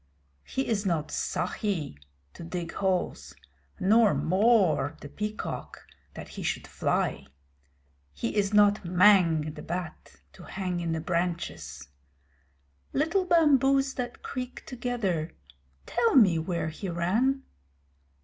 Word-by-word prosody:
He 265 - -2
is 210 -3 0
not 165 -6 -1
Sahi 180 - -2 0.4
to - - -10
dig 170 0 -5
holes, 185 - -2 0.4
nor 215 +2 +4
Mor, 185 - +2
the - - -9
Peacock, 210 +6 -5 0.3
that - - -8
he - - -8
should - - -2
fly. - - -1 0.8
He 70 - -4
is 200 -1 +1
not 205 0 +4
Mang, 175 -4 +4
the 150 - -9
Bat, 175 0 -6 0.2
to - - -14
hang 180 -1 -4
in 170 -1 -2
the 160 - -2
branches. 165 - -3 1.1
Little 335 +6 +1
bamboos 275 -5 +4
that 245 -1 -5
creak 255 -1 -6
together 230 -10 -2 0.5
tell 235 +1 +1
me 190 -10 +6
where 170 0 -2
he 180 +5 -6
ran? 220 +11 +1
190 Hz, 120 wpm, -28 LUFS, 170-235 Hz, 1.1 s, me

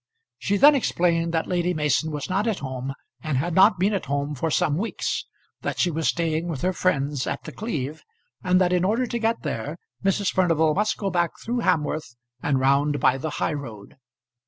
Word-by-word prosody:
She 200 +1 0
then 290 +7 +8
explained 170 -10 +1
that 160 - +1
Lady 180 0 0
Mason 150 +1 +1
was 150 -2 -4
not 195 +4 0
at 220 -4 0
home 130 0 -5 0.3
and 150 -2 -1
had 170 +6 -1
not 195 +4 +6
been 195 +4 +2
at 195 - -2
home 140 +1 -1
for 155 +4 -2
some 150 -1 +1
weeks; 215 +8 -2 0.3
that - - -3
she 175 - +2
was 160 0 -1
staying 165 0 0
with 155 -6 -4
her 185 +1 +1
friends 145 -7 0
at - - -3
The - - -7
Cleeve, 155 - -4 0.4
and 185 0 +3
that 180 -1 +2
in 180 0 +2
order 225 +7 +1
to 235 0 -3
get 225 +1 0
there - - -4 0.3
Mrs. 195 0 +1
Furnival 165 -4 +3
must 210 +4 0
go 195 -2 -2
back 175 -2 +1
through 240 +2 -2
Hamworth 150 - 0 0.3
and 140 -2 +1
round 140 +2 +2
by 130 +1 +3
the 160 - -3
high - - 0
road. 120 -3 -8
165 Hz, 205 wpm, -24 LUFS, 145-190 Hz, 0.4 s, then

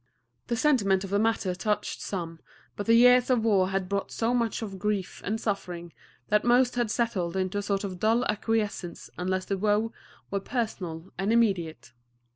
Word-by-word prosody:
The 240 - 0
sentiment 210 -9 +2
of 195 - -7
the 200 - +2
matter 220 -4 +1
touched 210 +3 -2
some, 165 -4 -5 0.4
but 205 - -5
the 230 - +6
years 250 +1 +6
of 240 -3 +2
war 195 -4 +3
had 190 -1 -1
brought 200 +1 -2
so 230 +1 0
much 230 -2 0
of 195 -3 -6
grief 205 -2 -2
and 220 +3 -2
suffering 180 -6 -4 0.4
that 210 0 +3
most 245 +1 +4
had 240 -2 0
settled 200 -7 -1
into 190 +1 -1
a - - -1
sort 200 0 -1
of 185 -3 -5
dull 225 +4 +2
acquiescence 210 -4 -2
unless 185 +1 -1
the 195 -1 -2
woe 215 +2 +1 0.4
were 200 - 0
personal 190 -7 -4
and 195 +3 +1
immediate. 175 - +1
205 Hz, 180 wpm, -27 LUFS, 185-225 Hz, 0.4 s, the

